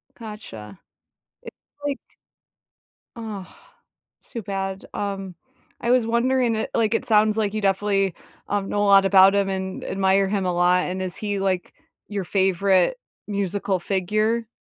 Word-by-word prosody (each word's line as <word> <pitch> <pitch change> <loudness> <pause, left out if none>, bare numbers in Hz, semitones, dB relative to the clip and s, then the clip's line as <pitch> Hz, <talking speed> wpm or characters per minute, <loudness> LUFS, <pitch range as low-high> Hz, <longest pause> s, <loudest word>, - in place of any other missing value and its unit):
Gotcha. 115 - -9 0.6
It - - -9 0.3
like 285 -1 -1 1.2
Ugh, 215 -5 -6 0.8
too 230 - -6
bad. 195 0 -4
Um, 195 -3 -4 0.5
I 235 - +1
was 250 -3 +4
wondering, 240 0 +2
it 220 - -2
like, 225 -1 +2
it - - 0
sounds 215 0 +3
like 210 -1 0
you 215 - -2
definitely, 195 -1 +1 0.3
um, 200 -1 -1
know 205 - 0
a - - +2
lot 195 -1 +7
about 195 0 +6
him, 200 -1 +2
and 190 0 -4
admire 190 0 +2
him 195 -1 -1
a 180 - 0
lot, 180 +1 +3
and 185 +1 -3
is 185 -1 -4
he, 205 -2 -2
like, 190 -2 -1 0.3
your 200 -2 -3
favorite 190 - +2 0.3
musical 200 -1 -1
figure? 215 +5 0
195 Hz, 150 wpm, -23 LUFS, 190-215 Hz, 1.2 s, lot